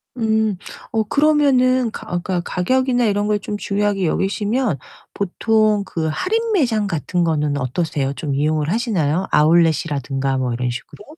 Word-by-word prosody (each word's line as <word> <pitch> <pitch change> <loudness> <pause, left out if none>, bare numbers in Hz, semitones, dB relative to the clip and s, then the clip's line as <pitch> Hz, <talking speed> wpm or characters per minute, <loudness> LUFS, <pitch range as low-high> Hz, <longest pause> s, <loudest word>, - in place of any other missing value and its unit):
음. 220 -3 +1 0.3
어 220 -1 +1
그러면은 260 -3 +3
가 - - -9
어 175 - -2
그러니까 180 -2 -1
가격이나 245 +6 +1
이런 205 -1 +1
걸 210 0 +2
좀 210 - -5
중요하게 205 -1 0
여기시면 205 - 0 0.3
보통 215 +2 +1
그 160 -3 -3
할인매장 325 - 0
같은 175 +1 -1
거는 150 -3 0
어떠세요? 140 +1 -2
좀 140 0 -4
이용을 150 +2 0
하시나요, 190 - 0
아웃렛이라든가 150 -4 +2
뭐 125 -2 -1
이런 125 +1 -2
식으로? 125 +11 -9
195 Hz, 345 characters per minute, -20 LUFS, 155-225 Hz, 0.3 s, 그러면은